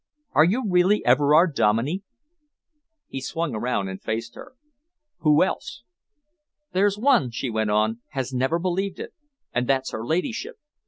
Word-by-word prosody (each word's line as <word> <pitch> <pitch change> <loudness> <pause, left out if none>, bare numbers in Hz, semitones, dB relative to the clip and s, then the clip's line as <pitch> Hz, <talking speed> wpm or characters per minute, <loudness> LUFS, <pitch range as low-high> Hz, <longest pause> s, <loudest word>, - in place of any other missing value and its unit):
Are 155 - +5
you 220 +9 +1
really 185 +2 +3
Everard 150 +6 +4
Dominey?" 115 - +1 1.1
He 135 - -6
swung 165 +1 -3
around 110 -3 -1
and 95 0 -7
faced 115 +1 -4
her. - - -12 0.6
"Who 150 0 +4
else?" 120 -9 -4 0.9
"There's 200 +2 +2
one," 235 - +3
she 120 +1 -4
went 110 -1 -1
on, 110 +2 +1
"has 135 -1 -3
never 130 +6 +1
believed 185 +2 -2
it, - - -7 0.4
and 120 +1 0
that's 135 -1 0
her 110 - -5
ladyship. 225 - -2
145 Hz, 145 wpm, -24 LUFS, 120-185 Hz, 1.1 s, Are